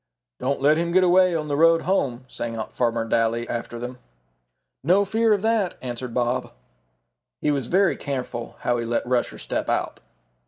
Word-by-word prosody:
"Don't 140 Hz, +2 st, -1 dB
let 145 Hz, +3 st, +4 dB
him 170 Hz, +1 st, -1 dB
get 185 Hz, +1 st, +4 dB
away 185 Hz, 0 st, +4 dB
on 155 Hz, -2 st, -2 dB
the 145 Hz, -, -1 dB
road 165 Hz, +2 st, +4 dB
home," 130 Hz, -9 st, 0 dB
sang 115 Hz, -2 st, -5 dB
out 110 Hz, -, -5 dB
Farmer 115 Hz, -2 st, 0 dB
Daly 115 Hz, +1 st, 0 dB
after 120 Hz, 0 st, -4 dB
them. 125 Hz, +1 st, -6 dB, 0.8 s
"No 185 Hz, +7 st, +4 dB
fear 225 Hz, +3 st, +2 dB
of 205 Hz, -1 st, +2 dB
that," 220 Hz, -5 st, +1 dB
answered 125 Hz, -1 st, -5 dB
Bob. 125 Hz, 0 st, 0 dB, 0.9 s
He 150 Hz, -, +1 dB
was 135 Hz, -4 st, -1 dB
very 190 Hz, +4 st, +3 dB
careful 125 Hz, -4 st, -5 dB
how 120 Hz, -1 st, 0 dB
he 115 Hz, -, -3 dB
let 120 Hz, +1 st, -1 dB
Rusher 125 Hz, -1 st, 0 dB
step -, -, -3 dB
out. -, -, -1 dB
135 Hz, 180 wpm, -24 LUFS, 120-175 Hz, 0.9 s, let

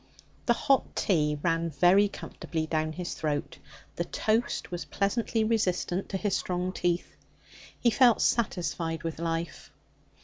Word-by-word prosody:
The 240 Hz, -, +6 dB
hot 270 Hz, +2 st, +1 dB
tea 150 Hz, -6 st, +1 dB
ran 165 Hz, -1 st, +1 dB
very 180 Hz, +7 st, +5 dB
comfortably 165 Hz, -4 st, -5 dB
down 155 Hz, 0 st, -1 dB
his 175 Hz, +1 st, -4 dB
throat; 150 Hz, -2 st, -3 dB, 0.4 s
the -, -, 0 dB
toast 220 Hz, -2 st, -1 dB
was 175 Hz, -1 st, -4 dB
pleasantly 220 Hz, +2 st, 0 dB
resistant 195 Hz, -4 st, 0 dB
to 195 Hz, -, -1 dB
his 200 Hz, 0 st, 0 dB
strong 180 Hz, 0 st, -2 dB
teeth. 175 Hz, -1 st, -1 dB, 0.6 s
He 235 Hz, -, +3 dB
felt 240 Hz, 0 st, +5 dB
satisfied 170 Hz, -7 st, 0 dB
with 165 Hz, -1 st, -4 dB
life. 165 Hz, -1 st, -3 dB
180 Hz, 135 wpm, -28 LUFS, 165-210 Hz, 0.6 s, The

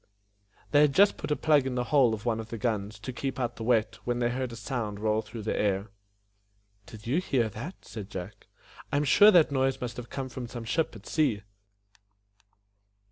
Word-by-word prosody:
They 145 Hz, -, +6 dB
had 150 Hz, -2 st, +4 dB
just 200 Hz, +1 st, +6 dB
put -, -, -6 dB
a 150 Hz, -, +2 dB
plug 150 Hz, -4 st, +3 dB
in 130 Hz, -, -3 dB
the 125 Hz, -, 0 dB
hole 125 Hz, -6 st, +5 dB
of 105 Hz, +1 st, -12 dB
one 115 Hz, -2 st, 0 dB
of 110 Hz, 0 st, -7 dB
the 115 Hz, -, -5 dB
guns, 105 Hz, -1 st, -2 dB
to 125 Hz, +4 st, -7 dB
keep 135 Hz, +2 st, -4 dB
out 120 Hz, -1 st, -2 dB
the 115 Hz, -, -5 dB
wet, 110 Hz, -1 st, +1 dB
when 120 Hz, 0 st, -1 dB
they 120 Hz, -1 st, +1 dB
heard 130 Hz, 0 st, -3 dB
a -, -, -7 dB
sound 115 Hz, -3 st, -4 dB
roll 110 Hz, 0 st, +1 dB
through 110 Hz, 0 st, -9 dB
the 110 Hz, -, -1 dB
air. 100 Hz, 0 st, 0 dB, 1.0 s
"Did 105 Hz, -2 st, -12 dB
you 140 Hz, +10 st, +1 dB
bear 120 Hz, -10 st, 0 dB
that?" 125 Hz, -, -8 dB
said 105 Hz, -2 st, -8 dB
Jack. 95 Hz, +1 st, -8 dB, 0.4 s
"I 145 Hz, -, +1 dB
am 145 Hz, -, +2 dB
sure 205 Hz, +8 st, +7 dB
that 175 Hz, -8 st, +5 dB
noise 135 Hz, -1 st, +1 dB
must 120 Hz, -1 st, -5 dB
have 120 Hz, -1 st, -7 dB
come 135 Hz, -1 st, -4 dB
from 125 Hz, -1 st, -6 dB
some 120 Hz, -1 st, -7 dB
ship 155 Hz, +2 st, -1 dB
at 105 Hz, -, -12 dB
sea. 130 Hz, -10 st, 0 dB
120 Hz, 215 wpm, -28 LUFS, 110-135 Hz, 1.0 s, sure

